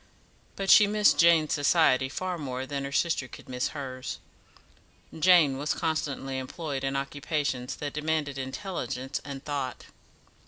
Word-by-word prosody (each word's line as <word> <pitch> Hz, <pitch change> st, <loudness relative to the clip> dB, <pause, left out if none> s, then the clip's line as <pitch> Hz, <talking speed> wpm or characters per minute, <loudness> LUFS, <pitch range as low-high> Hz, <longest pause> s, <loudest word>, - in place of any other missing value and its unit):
But 195 Hz, -1 st, +1 dB
she 210 Hz, -, +8 dB
missed 210 Hz, 0 st, +3 dB
Jane's 165 Hz, -2 st, +5 dB
society 145 Hz, -3 st, +3 dB
far 180 Hz, +4 st, -3 dB
more 130 Hz, -3 st, -4 dB
than 140 Hz, 0 st, -4 dB
her 140 Hz, -, -5 dB
sister 140 Hz, -2 st, 0 dB
could -, -, -12 dB
miss 125 Hz, 0 st, -1 dB
hers. 130 Hz, -3 st, -6 dB, 1.0 s
Jane 160 Hz, -6 st, +5 dB
was 145 Hz, +2 st, -1 dB
constantly 140 Hz, -4 st, -2 dB
employed 135 Hz, +1 st, -5 dB
in 135 Hz, 0 st, -1 dB
occupations 140 Hz, -2 st, -2 dB
that 145 Hz, -1 st, -5 dB
demanded 150 Hz, -2 st, -1 dB
intelligence 135 Hz, -2 st, -4 dB
and 140 Hz, -1 st, -8 dB
thought. 140 Hz, -3 st, -4 dB
145 Hz, 135 wpm, -28 LUFS, 135-160 Hz, 1.0 s, she